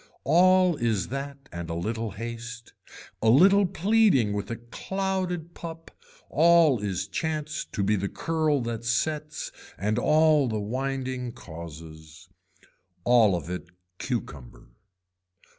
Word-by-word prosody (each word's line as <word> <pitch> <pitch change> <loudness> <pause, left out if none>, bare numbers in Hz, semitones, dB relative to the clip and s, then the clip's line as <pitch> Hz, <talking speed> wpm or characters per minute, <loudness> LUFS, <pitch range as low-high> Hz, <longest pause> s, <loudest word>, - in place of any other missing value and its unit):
All 180 +3 +5
is 110 -7 0
that 140 +1 -6
and 85 -1 -6
a 85 - -3
little 110 +6 -2
haste, 115 +2 -7 0.5
a 110 - +3
little 190 - +6
pleading 195 - +3
with 100 -1 -3
a 115 - -2
clouded 180 +7 -3
pup 165 -1 -9 0.4
all 165 -4 +5
is 100 -3 -3
chance 155 -1 -3
to 100 - -3
be 105 +2 +2
the 100 0 -2
curl 155 -4 0
that 115 -1 -4
sets 150 +6 -2 0.3
and 105 +4 0
all 155 -1 +4
the 110 -2 -2
winding 130 +2 -3
causes. 80 -5 -11 0.8
All 115 -5 +5
of 85 -3 -5
it 90 -1 -6 0.3
cucumber. 75 - -5
125 Hz, 125 wpm, -26 LUFS, 105-160 Hz, 0.8 s, little